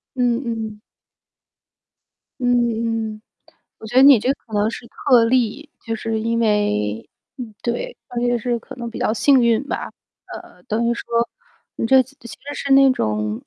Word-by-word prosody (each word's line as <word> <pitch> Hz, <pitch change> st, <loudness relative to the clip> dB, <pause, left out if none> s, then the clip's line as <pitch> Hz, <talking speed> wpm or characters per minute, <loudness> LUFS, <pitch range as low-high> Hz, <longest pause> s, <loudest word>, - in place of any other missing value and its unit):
嗯 245 Hz, 0 st, +1 dB
嗯。 220 Hz, -2 st, -4 dB, 1.6 s
嗯 245 Hz, -1 st, +2 dB, 0.6 s
嗯， 215 Hz, -, -15 dB, 0.6 s
我 220 Hz, -, -10 dB
觉 230 Hz, +4 st, -5 dB
得 260 Hz, -, +8 dB
你 275 Hz, 0 st, +9 dB
也 -, -, +3 dB
就 245 Hz, +5 st, 0 dB
可 230 Hz, -5 st, -12 dB
能 210 Hz, +1 st, +1 dB
是 235 Hz, -, -9 dB
特 240 Hz, -1 st, +3 dB
例， 255 Hz, +4 st, 0 dB, 0.2 s
就 225 Hz, -, -3 dB
是 225 Hz, 0 st, -3 dB
因 230 Hz, +1 st, -1 dB
为 115 Hz, -, 0 dB, 0.3 s
嗯， 235 Hz, -5 st, -8 dB
对， 485 Hz, -, -3 dB
大 245 Hz, -, -11 dB
约 240 Hz, 0 st, +1 dB
是 240 Hz, +1 st, -1 dB
可 -, -, -11 dB
能 240 Hz, -1 st, -6 dB
是 -, -, -5 dB
比 -, -, -8 dB
较 -, -, 0 dB
幸 260 Hz, +2 st, +4 dB
运 235 Hz, +1 st, +3 dB
吧， -, -, -4 dB, 0.4 s
呃， -, -, -11 dB
等 235 Hz, 0 st, -1 dB
于 235 Hz, -, +1 dB
说 -, -, -7 dB, 0.7 s
你 -, -, -2 dB
这 265 Hz, +2 st, +6 dB
次 265 Hz, +2 st, -20 dB
其 235 Hz, -, -12 dB
实 285 Hz, +5 st, -9 dB
是 280 Hz, -1 st, -1 dB
那 270 Hz, 0 st, +7 dB
种 105 Hz, -, -2 dB
235 Hz, 195 characters per minute, -20 LUFS, 220-255 Hz, 1.6 s, 你